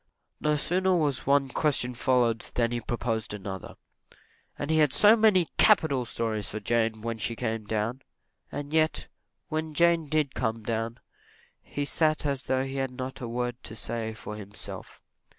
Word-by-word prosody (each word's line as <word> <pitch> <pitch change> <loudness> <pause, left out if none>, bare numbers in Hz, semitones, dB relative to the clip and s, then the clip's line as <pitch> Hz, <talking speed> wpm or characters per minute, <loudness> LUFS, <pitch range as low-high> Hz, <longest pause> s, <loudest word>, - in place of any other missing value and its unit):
No 150 0 +2
sooner 185 +5 +2
was 145 -6 0
one 140 -1 +3
question 130 -3 0
answered 120 -2 +1
than 120 -1 +2
he 120 0 -2
proposed 115 -2 -2
another 95 -1 -7 0.8
and 145 +2 -2
he 160 - +4
had 150 -3 +5
so 215 +1 +7
many 210 -6 +4
capital 155 - +4
stories 110 -4 -2
for 110 - -4
Jane, 110 0 0
when 115 -1 -3
she 110 +2 -1
came 115 -2 -3
down 110 +5 -2 0.5
and 145 +1 -5
yet, 160 0 +2 0.4
when 155 -1 -3
Jane 170 -1 +3
did 150 -2 +1
come 110 -2 -2
down, 115 +1 -2 0.6
he 145 - -4
sat 155 +1 +2
as 140 -2 +1
though 130 0 0
he 135 0 -4
had 135 -1 0
not 130 +1 -6
a 120 - -3
word 120 +1 -3
to 110 - -7
say 110 0 -3
for 105 -1 -7
himself. 105 -1 -9
125 Hz, 170 wpm, -28 LUFS, 115-150 Hz, 0.8 s, so